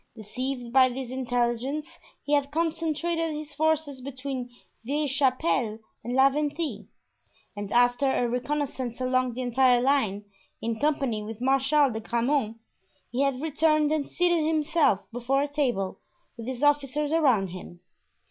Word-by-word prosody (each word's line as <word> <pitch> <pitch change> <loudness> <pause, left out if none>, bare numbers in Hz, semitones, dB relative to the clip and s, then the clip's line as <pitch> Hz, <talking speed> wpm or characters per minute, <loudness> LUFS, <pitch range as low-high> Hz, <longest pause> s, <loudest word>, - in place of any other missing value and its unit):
Deceived 245 +3 -5
by 260 -1 +6
this 255 0 -5
intelligence 250 +3 -1 0.4
he 290 - -2
had 285 -1 +2
concentrated 330 +1 -1
his 300 0 -7
forces 310 -3 0
between 260 -1 -5 0.3
Vieille 290 +5 -1
Chapelle 260 -4 +1 0.3
and 245 +1 -3
La 265 +1 +7
Venthie; 295 -5 -3 0.7
and 205 -1 -6
after 245 +3 +3
a 245 - +1
reconnoissance 255 0 -3
along 255 -1 +1
the 255 +2 -4
entire 250 0 +4
line, 240 -7 +1 0.3
in 225 -1 -3
company 275 -7 0
with 215 +1 -7
Marshal 270 +2 +3
de 220 - -4
Grammont, 235 0 0 0.5
he 245 +3 -1
had 275 -2 +1
returned 305 -1 +2
and 305 -3 -1
seated 345 -2 +2
himself 310 - +2
before 250 +4 0
a - - -1
table, 250 -10 -1 0.4
with 230 -1 -8
his 260 +1 -4
officers 290 0 +2
around 255 - +3
him. 175 -1 -10
265 Hz, 140 wpm, -27 LUFS, 240-295 Hz, 0.7 s, La